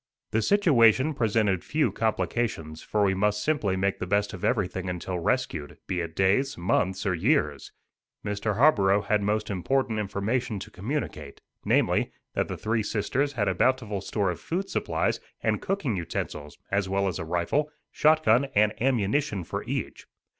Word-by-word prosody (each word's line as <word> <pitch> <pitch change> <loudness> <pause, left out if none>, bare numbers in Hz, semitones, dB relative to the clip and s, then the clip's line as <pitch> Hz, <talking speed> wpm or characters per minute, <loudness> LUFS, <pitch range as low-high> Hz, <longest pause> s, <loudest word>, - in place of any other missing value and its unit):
The 110 +1 +2
situation 140 - +4
presented 105 -6 +1
few 155 0 +1
complications, 110 -8 -2
for 105 -1 0
we 95 -1 +3
must 105 +2 +1
simply 125 -12 +1
make 95 +1 0
the 90 - -3
best 100 +2 +1
of 95 - -8
everything 95 -5 0
until 90 0 -3
rescued, 85 - -1
be 90 - -2
it 80 -1 -6
days, 100 +9 +2
months, 95 +2 0
or 95 - +2
years. 85 - 0 0.5
Mr. 105 0 -1
Harborough 100 -7 +4
had 105 -1 +1
most 105 +1 -1
important 110 +4 0
information 105 +3 -1
to 100 - -8
communicate, 135 +10 -4 0.3
namely, - - +2 0.2
that - - 0
the - - -5
Three 110 +1 0
Sisters 120 +7 -1
had 105 -5 0
a 95 - +2
bountiful 110 -2 +1
store 100 -1 -1
of 85 - -7
food 190 +4 -3
supplies - - 0 0.2
and - - +1
cooking 170 - -1
utensils, 75 -4 -5
as 100 -1 0
well 100 0 +1
as 95 - -3
a - - -3
rifle, 90 - 0 0.2
shot 155 +1 +3
gun 120 +1 +4
and 105 +1 +4
ammunition 115 -4 +1
for - - -4
each. - - -4
105 Hz, 165 wpm, -27 LUFS, 95-125 Hz, 0.5 s, situation